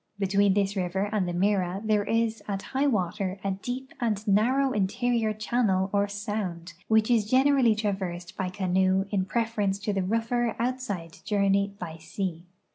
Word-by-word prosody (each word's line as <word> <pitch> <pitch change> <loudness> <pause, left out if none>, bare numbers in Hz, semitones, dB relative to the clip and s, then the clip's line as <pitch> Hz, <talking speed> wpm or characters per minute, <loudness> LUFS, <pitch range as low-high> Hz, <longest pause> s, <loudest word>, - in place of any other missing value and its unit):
Be 200 - 0
tween 200 0 +3
this 200 0 +1
river 190 +2 -1
and 205 -4 0
the 175 - -2
Mira 190 0 +1
there 210 -1 +2
is 225 0 0
at 195 -1 -3
high 270 +2 0
water 190 -4 -1
a 195 - 0
deep 250 +7 -5
and 215 -2 -1
narrow 255 +7 +3
interior 225 +2 +1
channel 215 -3 0
or 200 0 +2
sound, 200 -5 -4
which 220 +1 +3
is 215 -3 +2
generally 260 -3 +4
traversed 190 -3 -3
by 185 -1 -2
canoe 190 0 +1
in 190 -3 +1
preference 210 -2 0
to 210 0 -1
the 195 - 0
rougher 230 +4 0
outside 230 -9 -3
journey 200 -1 +1
by 165 -4 -6
sea. 170 +1 -4
205 Hz, 165 wpm, -27 LUFS, 190-225 Hz, -, generally